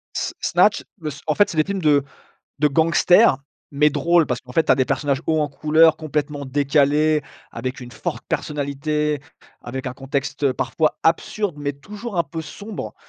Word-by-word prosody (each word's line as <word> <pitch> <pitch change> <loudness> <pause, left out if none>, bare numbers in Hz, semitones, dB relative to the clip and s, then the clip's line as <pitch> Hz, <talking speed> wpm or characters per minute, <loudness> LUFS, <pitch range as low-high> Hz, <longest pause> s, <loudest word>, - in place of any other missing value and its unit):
S - - -2
Snatch - - +3
bah 155 -4 -5 0.2
en 155 - +1
fait 205 - +4
c'est 160 - -6
des 155 - +5
films 195 0 -3
de 145 -3 +4 0.6
de 150 - +4
gangsters 165 +3 +4 0.4
mais 150 +1 +5
drôle. 165 +3 +3
Parce 125 0 -2
qu'en 125 0 -13
fait, 165 - +3
tu - - -1
as - - +2
des 130 - +2
personnages 140 0 -1
hauts 160 -1 +2
en 150 - 0
couleur 155 +3 +4
complètement 150 -2 -3
décalés 145 +2 +2 0.3
avec 130 0 -5
une 120 -1 -9
forte - - -5
personnalité 150 0 -2 0.4
avec 130 +2 -6
un - - -5
contexte 135 0 -2
parfois 155 +4 0
absurde 170 +1 0
mais 145 0 -2
toujours 205 - -8
un - - +4
peu 160 +3 -6
sombre 205 +8 -7
150 Hz, 180 wpm, -21 LUFS, 140-160 Hz, 0.6 s, des